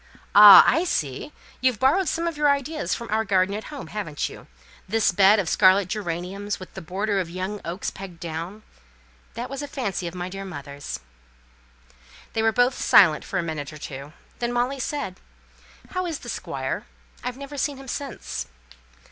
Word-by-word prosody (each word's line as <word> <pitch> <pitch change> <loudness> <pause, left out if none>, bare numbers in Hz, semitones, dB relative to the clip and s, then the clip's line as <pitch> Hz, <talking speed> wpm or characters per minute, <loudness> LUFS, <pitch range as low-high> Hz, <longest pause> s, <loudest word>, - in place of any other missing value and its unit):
Ah, 205 -1 +11
I 325 - +3
see! 150 - -2 0.3
you've 255 -3 +2
borrowed 325 +8 +3
some 335 +2 -1
of 335 - -2
your 295 0 +3
ideas 280 +2 0
from 235 - -7
our 220 +1 +2
garden 190 -1 +2
at 215 +2 -5
home, 290 -3 -7
haven't 180 -9 -3
you? - - -12 0.4
This 225 +2 +3
bed 195 +3 +6
of 195 -5 0
scarlet 185 +2 +4
geraniums, 195 +1 -3
with 185 - -11
the 190 - -7
border 195 +5 -1
of 180 -3 -3
young 185 +4 -4
oaks, 170 +4 -4
pegged 190 -3 -10
down! 170 +6 -6 0.7
That 240 +2 -4
was 275 +1 -5
a 290 - -5
fancy 200 -10 -3
of 170 - -7
my 180 0 -4
dear 195 +1 -6
mother's." 145 - -7 1.3
They 220 - 0
were 225 0 +3
both 245 +3 +2
silent 160 -6 +6
for 190 - -4
a 180 - 0
minute 155 -3 -4
or 155 - -10
two. 140 0 -8 0.3
Then 240 0 -1
Molly 245 +3 0
said, 255 -8 -3 0.7
"How 365 -1 -2
is 325 -3 -3
the - - -10
Squire? - - -4 0.4
I've 250 0 -4
never 280 +1 -8
seen 280 0 -1
him 270 0 -11
since." 245 - -5
205 Hz, 180 wpm, -24 LUFS, 180-260 Hz, 1.3 s, Ah